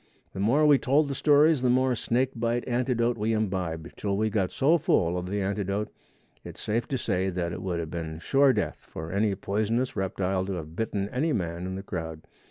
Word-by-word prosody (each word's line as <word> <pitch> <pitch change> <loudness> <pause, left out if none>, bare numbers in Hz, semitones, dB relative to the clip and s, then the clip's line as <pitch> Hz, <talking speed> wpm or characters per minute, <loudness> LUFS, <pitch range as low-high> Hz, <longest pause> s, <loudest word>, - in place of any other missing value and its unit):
The - - -6
more 125 +10 +3
we 145 -2 +6
told 140 +3 +2
the 140 - -2
stories 150 +1 +4
the 125 - +2
more 130 +1 +3
snake 125 +2 0
bite 120 +1 -1
antidote 120 -2 0
we 110 +2 +1
imbibed, 95 -7 -2
till 100 -1 -2
we 110 +1 +1
got 95 -3 +1
so 160 +5 +3
full 85 - +2
of 90 0 -3
the 100 +1 -1
antidote 100 +1 -2 0.5
it's - - -10
safe 115 +2 -1
to 135 - -1
say 95 -5 0
that 90 -2 -2
it - - -5
would 90 -3 -2
have 80 -1 -5
been 80 -2 -4
sure 135 - +4
death - - -1
for 80 +1 -6
any 100 +1 +1
poisonous 110 +6 -1
reptile 95 0 -1
to 100 - -2
have 80 -2 -6
bitten 100 -2 -2
any 150 +7 0
man 85 0 -2
in 95 - -4
the 95 - -6
crowd. 80 -4 -6
105 Hz, 210 wpm, -27 LUFS, 90-125 Hz, 0.5 s, we